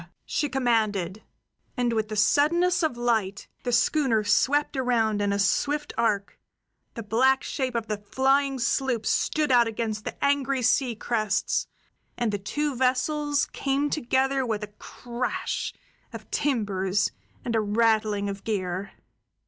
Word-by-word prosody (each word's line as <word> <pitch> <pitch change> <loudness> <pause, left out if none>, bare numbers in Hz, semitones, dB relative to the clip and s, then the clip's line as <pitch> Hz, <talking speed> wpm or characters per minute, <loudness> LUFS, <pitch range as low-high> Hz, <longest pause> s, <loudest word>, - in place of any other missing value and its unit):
she 295 - -1
commanded; 220 -7 0 0.6
and 245 -1 +1
with 220 -1 -1
the 215 - -4
suddenness 335 - +3
of 310 -7 0
light 220 -5 -1
the 245 - -2
schooner 235 -1 +2
swept 285 +9 +2
around 230 -5 +1
in 205 0 +1
a 200 - 0
swift 290 +9 0
arc, 210 -4 -1 0.6
the 230 - -5
black 260 +5 +2
shape 260 -3 -3
of 230 -2 -1
the 215 -1 -3
flying 270 +6 +1
sloop 245 -1 0
stood 305 -3 +1
out 240 -2 +5
against 220 -1 -3
the - - -3
angry 275 -2 +1
sea 245 0 +2
crests, 215 -2 -1 0.5
and 235 -3 0
the 205 - -2
two 290 +8 -2
vessels 285 +4 +1
came 280 +1 0
together 270 -1 +1
with 220 -4 -2
a 210 0 -8
crash 245 0 -4 0.4
of - - -10
timbers 205 -7 0 0.3
and 230 - -1
a 220 - +3
rattling 215 -1 +1
of 195 0 -5
gear. 190 -2 -3
235 Hz, 140 wpm, -26 LUFS, 210-270 Hz, 0.6 s, out